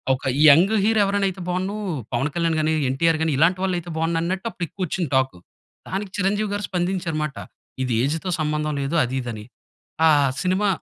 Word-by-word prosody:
ఒక 130 - -12 0.3
young 175 +9 +6
hero 220 +1 +3
ఎవరైనా 200 0 +1
అయితే 185 0 -8
బావున్ను. 185 +3 -2 0.4
పవన్ 135 +5 0
కళ్యాణ్ 165 -1 +1
గాని 155 0 +1 0.2
ఎన్టీఆర్ 160 +5 +2
గాని 160 -1 +1
ఇలాంటి 175 +4 +3
వాళ్ళు 185 -1 0
అయితే 175 - -10
బావున్నన్నట్టు 170 +4 -1
అప్పుడు 180 - -4
ఎక్కువ 190 - -6
వచ్చింది 170 -1 -2
టాక్. 130 -6 +1 0.5
దానికి 195 0 -4
చిరంజీవి 205 +2 0
గారు 205 0 -3
స్పందించారు 175 -3 -1
మాట. 145 -2 -4 0.5
"ఇది 125 -2 -1
ఏజ్‌తో 160 +6 -1
సంబంధం 150 0 -1
లేదు," 140 +4 -2
అది 125 +2 -3
ఇది 120 - -6
అని. 105 -1 -9 0.6
ఆ - - +7 0.3
సినిమా 190 +3 +1
170 Hz, 185 wpm, -23 LUFS, 150-190 Hz, 0.6 s, ఆ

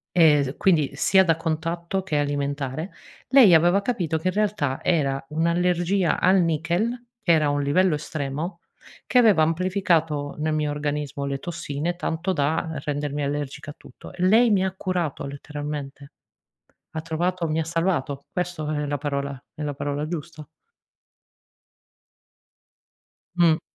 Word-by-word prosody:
e 155 -4 +6
d 135 +1 -5
quindi, 160 -7 +2
sia 190 +7 +5
da 165 -3 +2
contatto 170 +3 -2
che 160 -6 -1
alimentare, 145 +2 -2 0.4
lei 250 -8 +7
aveva 175 +4 +5
capito 180 -8 -1
che 160 +3 -3
in 185 - +1
realtà 195 -10 0
era 140 -5 +1
un'allergia 175 +3 +1
al 185 +1 +4
nichel, 175 +9 -1 0.2
che 170 - +2
era 155 -2 +4
a 145 - +2
un 145 0 0
livello 165 +4 +3
estremo, 150 +2 -4 0.5
che - - +2
aveva 210 -9 +5
amplificato 165 -4 0
nel 155 +1 0
mio 150 -1 0
organismo 145 -1 -3
le 140 0 -3
tossine, 170 0 -4
tanto 175 +1 -2
da 160 0 -1
rendermi 145 0 -2
allergica 145 0 -4
a - - -15
tutto. - - -13
E 180 - -9
lei 230 +4 +5
mi 190 -2 +3
ha 190 - -2
curato 180 -6 -2
letteralmente, 145 0 -6 0.8
ha 160 - -4
trovato 170 +2 -1
mi 155 - 0
ha 160 - -1
salvato, 165 -5 -1
questo 180 -4 -3
è 150 -1 -1
la 145 0 -2
parola 140 -1 -4
è - - -10
la 150 -1 -2
parola 145 +2 -3
giusta. 155 -2 -6 2.9
Mh. 165 -2 +4
160 Hz, 145 wpm, -24 LUFS, 145-180 Hz, 2.9 s, lei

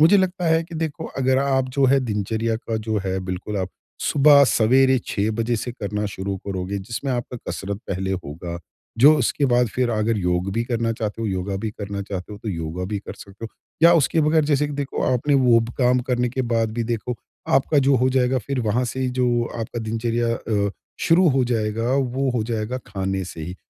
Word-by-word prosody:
मुझे 165 +6 +7
लगता 185 -2 0
है 165 0 +3
कि 170 +1 -11
देखो 160 0 -3
अगर 130 0 +2
आप 135 -1 +1
जो 140 - +4
है 135 +2 +4
दिनचर्या 110 0 -1
का 115 0 -4
जो 110 0 -2
है 95 0 -1
बिल्कुल 95 +3 -4
आप 95 -1 -2 0.3
सुबह 145 0 +6
सवेरे 130 +2 +4
6 105 +1 0
बजे 115 +2 0
से 120 +3 -4
करना 105 -2 -3
शुरू 100 0 -4
करोगे, 95 0 -3
जिसमें 115 +7 -4
आपका 125 0 -3
कसरत 100 0 -4
पहले 95 0 -2
होगा। 85 -1 -5 0.4
जो 145 +6 +8
उसके 140 +2 +1
बाद 120 -1 +3
फिर 125 +3 0
अगर 110 0 +1
योग 90 0 0
भी 115 +3 0
करना 115 -1 -1
चाहते 110 0 -4
हो, 110 - -1
योगा 95 +1 -2
भी 110 +2 -3
करना 100 -1 -5
चाहते 100 0 -6
हो 105 - -8
तो 110 - -4
योगा 85 -1 -3
भी 100 +2 -3
कर 100 - -9
सकते 100 +3 -11
हो। - - -5 0.3
या 170 +1 +8
उसके 160 0 +3
बगैर 155 0 +3
जैसे 145 0 +2
कि 145 - -6
देखो 140 -1 -3
आपने 140 +4 +1
वो 125 -4 +5 0.2
काम 125 -1 +4
करने 125 -1 +1
के 130 +2 -2
बाद 115 -1 +1
भी 120 - -1
देखो 120 +1 -3 0.3
आपका 135 +3 +3
जो 140 0 +4
हो 130 +1 +2
जाएगा 130 0 +2
फिर 135 +2 -3
वहाँ 115 +2 +1
से 130 +2 -2
जो 125 - +3 0.3
आपका 115 +1 -4
दिनचर्या 115 +1 -1
अ, 100 -3 -1 0.3
शुरू 175 +2 +4
हो 130 -1 +2
जाएगा 115 0 -1
वो 135 0 0
हो 120 -3 0
जाएगा 115 +2 -2
खाने 95 -2 -2
से 85 - -8
ही। 90 +4 -5
115 Hz, 210 wpm, -22 LUFS, 100-130 Hz, 0.4 s, जो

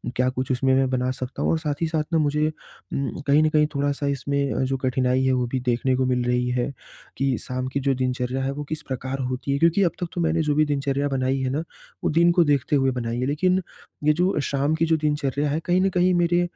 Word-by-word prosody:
क्या 125 +1 +2
कुछ 130 +1 -3
उसमें 130 +1 +2
मैं 135 -1 +2
बना 125 -1 0
सकता 130 0 -6
हूँ - - +2
और 165 - +2
साथ 150 -2 -2
ही 165 - +2
साथ 160 -1 0
न 165 - +4
मुझे 150 +1 +1 0.5
उम, 140 +2 -3
कहीं 145 +2 +5
न 155 - +3
कहीं 150 -1 +3
थोड़ा-सा 140 0 -1
इसमें 140 0 -1
जो 135 +1 -1
कठिनाई 130 0 +1
है 130 - +3
वो 125 -1 +1
भी 130 - 0
देखने 125 +1 0
को 130 0 +1
मिल 125 -1 +1
रही 125 0 0
है, 125 +2 -1 0.5
कि 135 -2 +1
शाम 130 0 -4
की 140 - +1
जो 135 0 +1
दिनचर्या 130 +1 -1
है 135 - -1
वो 145 +1 -5
किस 155 -1 -3
प्रकार 130 +1 -4
होती 130 +1 -3
है? 140 - +1
क्योंकि 170 +5 +4
अब 170 - +2
तक 175 - -2
तो 175 - -2
मैंने 165 0 +1
जो 150 -1 0
भी 155 +1 +4
दिनचर्या 140 -1 -1
बनाई 135 0 0
है 130 - 0
ना, 145 +5 -1 0.4
वो - - +2
दिन 170 +2 +4
को 170 0 +4
देखते 145 -1 +1
हुए 135 -1 +2
बनाई 120 -1 -3
है, 125 - 0
लेकिन 180 +6 +1 0.4
ये 150 +1 +4
जो 180 +1 +1
शाम 140 +3 +1
की 165 - +1
जो 160 -1 +2
दिनचर्या 145 -1 0
है 150 +3 0
कहीं 180 +1 +2
न 195 - +3
कहीं 180 +1 +3
मेरे 175 0 +2
140 Hz, 255 wpm, -24 LUFS, 130-155 Hz, 0.5 s, कहीं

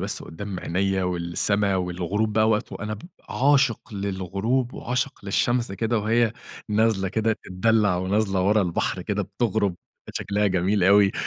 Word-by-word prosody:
بس - - -2
قدّام 95 +3 -6
عينيَّ 95 +2 0
والسما 90 +3 +1
والغروب 90 +4 -1
بقى 110 0 +3
وقته 105 -1 0
أنا 105 +1 -3
ب 105 - -12 0.3
عاشق 135 -4 +2
للغروب 100 +6 -2
وعاشق 125 -1 -3
للشمس 120 +2 0
كده 115 +3 0
وهي 115 +1 +2 0.4
نازلة 105 -3 +2
كده 110 +2 0
تدّلع 105 0 +2
ونازلة 95 +1 0
ورا 105 +2 +3
البحر 90 +1 -1
كده 105 +2 -1
بتغرب 105 +1 0 0.4
كان - - -10
شكلها 105 +1 0
جميل 95 +1 +1
أوي 100 +1 +5
100 Hz, 145 wpm, -24 LUFS, 95-110 Hz, 0.4 s, أوي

